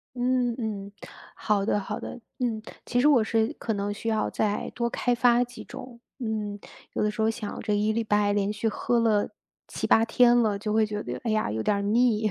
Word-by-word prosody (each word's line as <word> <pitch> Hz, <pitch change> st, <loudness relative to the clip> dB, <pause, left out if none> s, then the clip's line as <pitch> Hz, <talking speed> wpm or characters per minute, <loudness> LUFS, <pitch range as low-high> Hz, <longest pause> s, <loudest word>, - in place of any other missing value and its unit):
嗯 250 Hz, -1 st, +1 dB
嗯， 205 Hz, -3 st, -4 dB, 0.4 s
好 205 Hz, -2 st, 0 dB
的 210 Hz, -, +1 dB
好 195 Hz, -, -5 dB
的， -, -, -7 dB, 0.2 s
嗯， 235 Hz, -4 st, -1 dB, 0.2 s
其 245 Hz, -, +1 dB
实 285 Hz, -, +5 dB
我 270 Hz, -7 st, +5 dB
是 220 Hz, 0 st, +1 dB
可 225 Hz, -, -2 dB
能 200 Hz, 0 st, -2 dB
需 210 Hz, +2 st, -6 dB
要 220 Hz, -1 st, 0 dB
再 210 Hz, -1 st, -1 dB
多 235 Hz, -1 st, 0 dB
开 245 Hz, +1 st, 0 dB
发 245 Hz, 0 st, +4 dB
几 245 Hz, 0 st, -9 dB
种， 245 Hz, -2 st, -10 dB, 0.2 s
嗯， 215 Hz, -4 st, -3 dB, 0.3 s
有 -, -, -1 dB
的 210 Hz, -, +2 dB
时 210 Hz, -, -8 dB
候 220 Hz, 0 st, +3 dB
想 220 Hz, -2 st, -6 dB
着 215 Hz, -, -1 dB
一 210 Hz, +1 st, +2 dB
礼 230 Hz, +1 st, 0 dB
拜 210 Hz, -1 st, +2 dB
连 205 Hz, 0 st, 0 dB
续 215 Hz, +2 st, -2 dB
喝 235 Hz, +2 st, 0 dB
了 220 Hz, -3 st, +2 dB, 0.4 s
7-8 225 Hz, -, +2 dB
天 240 Hz, +1 st, +5 dB
了， 215 Hz, -4 st, +2 dB
就 210 Hz, +1 st, -3 dB
会 220 Hz, 0 st, +3 dB
觉 210 Hz, -1 st, -4 dB
得， -, -, -5 dB
哎 230 Hz, -, 0 dB
呀， 215 Hz, 0 st, +1 dB
有 110 Hz, +1 st, -2 dB
点 200 Hz, -, +1 dB
腻， 225 Hz, -3 st, +3 dB
220 Hz, 225 characters per minute, -26 LUFS, 210-240 Hz, 0.4 s, 实